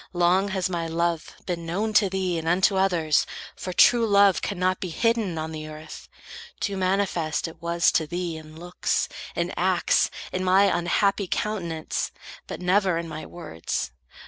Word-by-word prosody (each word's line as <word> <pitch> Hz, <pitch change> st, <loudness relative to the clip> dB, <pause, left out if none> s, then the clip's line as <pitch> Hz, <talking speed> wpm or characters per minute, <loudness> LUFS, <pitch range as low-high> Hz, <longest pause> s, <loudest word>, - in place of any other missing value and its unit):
Long 180 Hz, +3 st, +3 dB
has 190 Hz, -2 st, -1 dB
my 170 Hz, -2 st, -2 dB
love 170 Hz, 0 st, -1 dB
Been 175 Hz, -2 st, -3 dB
known 200 Hz, +7 st, -2 dB
to 210 Hz, -2 st, +4 dB
thee, 185 Hz, -3 st, -1 dB
and 160 Hz, -, -6 dB
unto 190 Hz, +3 st, +3 dB
others, 175 Hz, -6 st, +2 dB, 0.3 s
for 185 Hz, -, -5 dB
True 230 Hz, +5 st, +5 dB
love 200 Hz, -2 st, +5 dB
cannot 185 Hz, -1 st, 0 dB
be 185 Hz, -, -4 dB
hidden 225 Hz, -2 st, 0 dB
on 160 Hz, 0 st, -3 dB
the 155 Hz, -1 st, -6 dB
earth. 155 Hz, 0 st, -10 dB, 0.5 s
Too 200 Hz, -, -2 dB
manifest 185 Hz, -5 st, 0 dB
it 165 Hz, -, -12 dB
was 170 Hz, 0 st, +2 dB
to 160 Hz, -, +1 dB
thee, 175 Hz, 0 st, -3 dB
in 155 Hz, 0 st, -11 dB
looks, 175 Hz, +1 st, -1 dB, 0.3 s
In -, -, -1 dB
acts, -, -, +2 dB, 0.2 s
in 185 Hz, -, -2 dB
my 190 Hz, +2 st, +4 dB
unhappy 195 Hz, +3 st, +1 dB
countenance, 170 Hz, -7 st, -2 dB, 0.4 s
But -, -, -6 dB
never 185 Hz, -1 st, +2 dB
in 170 Hz, 0 st, -3 dB
my 155 Hz, -1 st, -7 dB
words. 120 Hz, -, -4 dB
180 Hz, 165 wpm, -25 LUFS, 165-195 Hz, 0.5 s, True